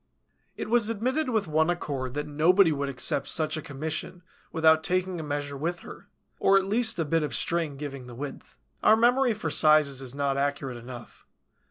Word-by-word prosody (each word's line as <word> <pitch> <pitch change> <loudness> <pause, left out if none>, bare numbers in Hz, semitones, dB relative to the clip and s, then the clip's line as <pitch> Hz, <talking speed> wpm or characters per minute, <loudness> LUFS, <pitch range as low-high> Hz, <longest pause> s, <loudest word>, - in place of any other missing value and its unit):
It - - -4
was 230 -1 +2
admitted 255 +7 -1
with 220 -6 0
one 160 +1 +2
accord 140 -7 -3
that 150 0 -2
nobody 165 +5 +4
would 140 -1 -2
accept 135 +1 -2
such 155 -1 -1
a 155 - -4
commission 155 +5 -5 0.3
without 160 -1 +4
taking 185 0 0
a - - -5
measure 145 -1 -4
with 170 +5 -3
her, - - -12 0.3
or 195 - +5
at 195 - +1
least 220 +3 +1
a 165 - 0
bit 165 +2 +1
of 150 - -2
string 165 -4 -1
giving 140 -3 -7
the 120 - -10
width. 140 +2 -8 0.2
Our 215 - +6
memory 245 +1 +3
for 165 -7 -4
sizes 150 -3 +4
is 130 0 -5
not 140 -1 -1
accurate 140 -2 -2
enough. 120 0 -11
155 Hz, 190 wpm, -27 LUFS, 140-185 Hz, 0.3 s, Our